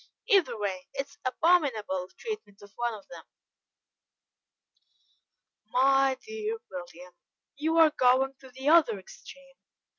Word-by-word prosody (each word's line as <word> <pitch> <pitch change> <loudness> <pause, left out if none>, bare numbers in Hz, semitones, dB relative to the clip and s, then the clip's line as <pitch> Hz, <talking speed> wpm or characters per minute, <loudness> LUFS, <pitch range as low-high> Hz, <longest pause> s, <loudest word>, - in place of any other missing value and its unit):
Either 345 - +3
way, 190 -3 -4
it 275 - -2
is - - -20
abominable 255 - +1
treatment 425 - -7
of 205 - -14
one 240 -1 -2
of 205 - -14
them." - - -11 2.4
"My 270 +2 +3
dear 440 0 -4
William, 180 0 -9 0.4
you 315 +4 0
are 320 -2 +7
going 265 -1 +3
to 265 - -14
the 260 +2 -7
other 300 -9 +5
extreme. 270 +8 -14
265 Hz, 120 wpm, -28 LUFS, 210-310 Hz, 2.4 s, are